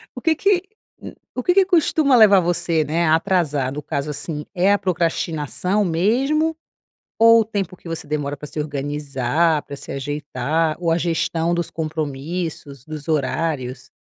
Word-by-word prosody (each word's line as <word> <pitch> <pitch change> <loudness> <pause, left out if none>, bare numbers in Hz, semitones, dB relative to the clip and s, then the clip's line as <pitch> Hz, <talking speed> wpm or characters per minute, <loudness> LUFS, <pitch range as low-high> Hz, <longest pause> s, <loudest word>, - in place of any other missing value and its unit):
o - - -7
que 325 -1 +2
que 380 +2 +2 0.4
u - - -8 0.2
o 255 - -3
que 360 - +3
que 390 0 +5
costuma 315 -6 +3
levar 210 -4 +7
você, 170 -2 +1
né, 165 +3 0
a 160 0 +5
atrasar, 160 -7 0
no 150 - -5
caso 145 -1 -3
assim, 150 +1 -5
é 185 +2 +3
a 205 - +2
procrastinação 175 +1 -1
mesmo, 260 - +1 0.6
ou 230 0 +7
o - - +1
tempo 200 -4 -4
que 175 - -12
você 165 -2 -5
demora 145 -1 -2
pra 150 +2 -9
se 155 - -8
organizar, 145 +1 0
pra 140 - -9
se - - -8
ajeitar, 145 +2 -2
ou 170 -2 0
a 165 - +2
gestão 170 0 0
dos 170 0 -2
compromissos, 155 -2 -4
dos 155 -1 -7
horários? 135 -4 -2
165 Hz, 165 wpm, -21 LUFS, 145-190 Hz, 0.6 s, levar